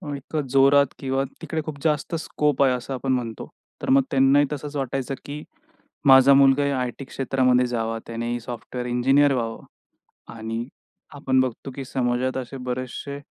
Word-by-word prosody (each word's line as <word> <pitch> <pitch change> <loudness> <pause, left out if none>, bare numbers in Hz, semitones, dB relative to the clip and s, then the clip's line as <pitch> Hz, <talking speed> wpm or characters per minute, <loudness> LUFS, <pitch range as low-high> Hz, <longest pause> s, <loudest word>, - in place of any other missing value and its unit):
इतकं 140 +1 -4
जोरात 140 +1 +5
किंवा 135 0 -1 0.2
तिकडे 160 -1 -3
खूप 150 -3 -6
जास्त 155 +1 0
स्कोप 150 -3 0
आहे 130 -2 +4
असं 125 +2 -4
आपण 130 +1 -2
म्हणतो. 115 -3 -4 0.3
तर - - -4
मग 135 +1 +6
त्यांनाही 135 +2 +4
तसंच 145 +1 -6
वाटायचं, 135 -1 -2
की 145 +1 -7 0.6
माझा 135 0 +8
मुलगा 140 +1 +5
या 140 -2 0
आयटी 125 +2 -4
क्षेत्रामध्ये 130 -1 +1
जावा. 115 -1 -2
त्यानेही 115 +1 -3
सॉफ्टवेअर 125 +1 -6
इंजिनिअर 135 +4 +3
व्हावं 115 -3 -3 0.7
आणि 115 0 -4 0.5
आपण 130 -2 +1
बघतो 130 +1 -3
की 135 - -5
समाजात 130 0 -1
असे 130 +1 -5
बरेचसे 130 +3 -4
135 Hz, 155 wpm, -23 LUFS, 125-140 Hz, 0.7 s, माझा